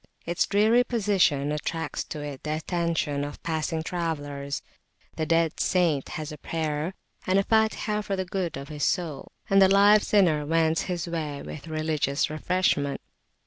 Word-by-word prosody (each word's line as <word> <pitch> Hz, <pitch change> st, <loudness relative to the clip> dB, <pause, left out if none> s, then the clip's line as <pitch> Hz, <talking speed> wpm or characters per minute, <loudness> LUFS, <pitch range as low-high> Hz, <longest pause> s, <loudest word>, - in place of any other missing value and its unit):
Its 170 Hz, +1 st, 0 dB
dreary 220 Hz, +4 st, +4 dB
position 195 Hz, -, +1 dB
attracts 155 Hz, 0 st, -3 dB
to 150 Hz, -, -7 dB
it 145 Hz, -2 st, -6 dB
the 155 Hz, 0 st, -2 dB
attention 160 Hz, -3 st, -1 dB
of 145 Hz, 0 st, -7 dB
passing 160 Hz, 0 st, -1 dB
travellers; 145 Hz, -5 st, -3 dB, 0.5 s
the 155 Hz, -, -2 dB
dead 165 Hz, -1 st, +2 dB
saint 170 Hz, -7 st, +1 dB
has 155 Hz, 0 st, -5 dB
a 150 Hz, -, -9 dB
prayer 160 Hz, +3 st, -2 dB, 0.3 s
and 185 Hz, +1 st, +3 dB
a 195 Hz, -, +4 dB
Fatihah 220 Hz, -1 st, +1 dB
for 200 Hz, -, -2 dB
the 190 Hz, -1 st, -2 dB
good 180 Hz, -4 st, -3 dB
of 140 Hz, +1 st, -8 dB
his 150 Hz, -2 st, -4 dB
soul, 165 Hz, -6 st, -1 dB, 0.2 s
and 195 Hz, 0 st, +5 dB
the 190 Hz, -, +7 dB
live 205 Hz, +2 st, +6 dB
sinner 175 Hz, -9 st, +3 dB
wends 160 Hz, +1 st, +2 dB
his 175 Hz, -2 st, -2 dB
way 155 Hz, -4 st, -4 dB
with 155 Hz, +2 st, -8 dB
religious 155 Hz, -2 st, 0 dB
refreshment. 155 Hz, -3 st, 0 dB
165 Hz, 160 wpm, -26 LUFS, 150-185 Hz, 0.5 s, the